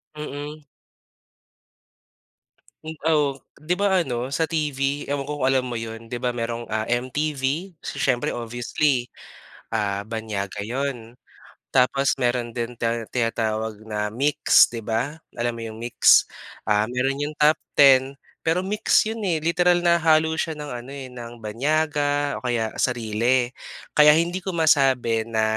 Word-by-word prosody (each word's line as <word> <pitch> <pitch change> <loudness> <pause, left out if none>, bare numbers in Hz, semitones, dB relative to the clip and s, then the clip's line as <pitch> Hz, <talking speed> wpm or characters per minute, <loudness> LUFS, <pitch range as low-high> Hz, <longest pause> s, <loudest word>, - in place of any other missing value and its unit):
Mm. 150 0 -7 2.2
Hmm, 160 0 -6 0.2
oo. 145 -3 +2 0.2
'Di 160 +4 -1
ba 200 +1 +1
ano 125 -4 -3
sa 160 +4 0
TV, 145 -3 -1
ewan 140 -1 -3
ko 145 -2 -4
kung - - +3
alam 130 -1 +1
mo 120 - -4
'yon. 115 0 -6
'Di 120 - -5
ba 125 0 -1
mayrong, 115 0 -3
ah, 110 0 -1
MTV, 140 +7 -1
so 140 - -6
siyempre 120 -3 +1
obviously 120 +2 -1 0.6
ah, 100 -1 -1
banyaga 105 -3 -4
'yon. 125 -1 -4 0.6
Tapos 135 +2 +2
meron 120 -2 -1
din 120 0 -4
ti 115 - 0 0.2
tinatawag 110 -2 -1
na 105 -1 -2
MYX 140 +7 +4
'di 115 - -5
ba. 115 +8 -2 0.2
Alam 120 0 -1
mo - - -6
'yong 110 0 -9
MYX? 120 - +5 0.3
Um, 105 0 +2
meron 135 +2 0
'yong 150 +1 -3
top 150 +1 +4 0.2
ten, 135 -1 +6 0.2
pero 165 +3 0
MYX 210 +2 +2
'yon 225 - -6
eh, 160 -3 0
literal 175 +1 +3
na 170 -1 +4
halo 160 0 +3
siya 160 -2 -2
ng 150 -1 -7
ano 125 +3 -11
eh, 130 -2 -8
ng 120 -2 -10
banyaga 145 +4 0
o - - -23
kaya 115 -3 0
sarili. 120 +1 +1 0.4
Kaya 150 0 +7
hindi 170 +3 0
ko 190 -1 -5
masabi 130 -8 +3
na, 110 -1 0
130 Hz, 150 wpm, -23 LUFS, 115-150 Hz, 2.2 s, Kaya